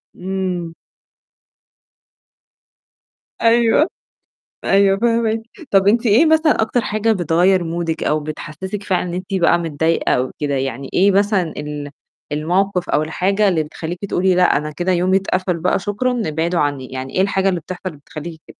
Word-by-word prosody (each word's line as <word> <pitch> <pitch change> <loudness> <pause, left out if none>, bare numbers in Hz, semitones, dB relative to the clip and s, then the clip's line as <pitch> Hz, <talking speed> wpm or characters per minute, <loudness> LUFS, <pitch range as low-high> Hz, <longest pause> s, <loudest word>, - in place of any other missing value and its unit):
إمم. 180 -3 -3 2.7
أيوه. 235 +6 +4 0.8
أيوه، 195 0 +3
فاهماكِ، 230 -1 +1 0.3
طب 195 0 +4
أنتِ 230 +3 +3
إيه 230 +9 +5
مثلًا 315 -3 +3
أكتر 225 +2 +1
حاجة 215 +1 0
بتغيّر 180 0 +2
مودِك 165 -1 -3
أو 155 +1 +1
بتحسسِك 155 +6 -6
فعلًا 185 -3 0
إن - - -5
أنتِ 185 +2 -5
بقى 175 -2 +3
متضايقة 165 0 0
أو 130 +1 0
كده، 145 -2 -1
يعني 135 0 -3
إيه 195 +2 +4
مثلًا 195 -4 +1
ال 150 -1 -5 0.4
المَوقِف 180 +5 0
أو 150 - +2
الحاجة 195 +6 +1
اللي 165 -5 +1
بتخلّيكِ 165 +3 -6
تقولي: 185 -1 +1
"لأ، 180 -5 +4
أنا 150 +1 -4
كده 175 +4 -1
يومي 185 +2 +2
اتقفل 185 -2 -1
بقى، 180 +3 +1
شكرًا، 235 +5 -1
ابعدوا 165 +3 -1
عني." 145 -3 -1
يعني 130 0 -6
إيه 185 - +3
الحاجة 195 0 +1
اللي 180 -2 -1
بتحصل 185 +2 -6
بتخلّيكِ 155 +3 -9
كده؟ - - -11
180 Hz, 150 wpm, -19 LUFS, 160-200 Hz, 2.7 s, إيه